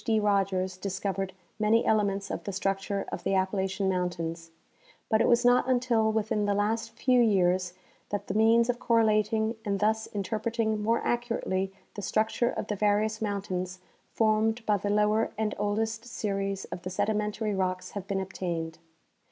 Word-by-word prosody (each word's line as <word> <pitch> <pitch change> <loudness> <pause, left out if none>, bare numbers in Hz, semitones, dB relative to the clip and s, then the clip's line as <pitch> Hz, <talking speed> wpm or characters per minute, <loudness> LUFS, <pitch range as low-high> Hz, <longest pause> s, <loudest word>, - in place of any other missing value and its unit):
D. 220 -1 +2
Rogers 195 -3 +1
discovered 195 0 -3 0.3
many 220 +2 +3
elements 200 -2 +1
of - - -4
the 200 - -2
structure 195 +1 -1
of - - -5
the 195 - +1
Appalachian 190 +1 0
mountains; 175 -3 -2 0.6
but 220 -1 +3
it - - +3
was 240 0 +4
not 245 +1 +4
until 240 -3 +2
within 215 -1 0
the 200 - +2
last 220 +2 0
few 250 +2 +2
years 185 -4 +2 0.4
that 205 -1 -3
the - - -3
means 225 +2 +4
of 245 -1 -1
correlating 220 -1 +2
and 200 -2 -1
thus 220 +2 +1
interpreting 220 +2 -1
more 230 +2 +1
accurately 230 -6 -1 0.2
the 205 - -6
structure 220 +4 +1
of - - -3
the 210 - -2
various 210 +2 +1
mount 205 -2 -2
ains 185 0 -3 0.3
formed 220 +1 +1
by 210 - +3
the 205 +1 -3
lower 210 +2 +2
and 215 -1 0
oldest 220 +2 -1
series 195 -4 -3
of 175 - -5
the 185 - -5
sedimentary 210 +2 -1
rocks 185 -1 -2
have 195 -2 -6
been 195 0 -1
obtained. 170 -4 -4
210 Hz, 165 wpm, -28 LUFS, 190-220 Hz, 0.6 s, was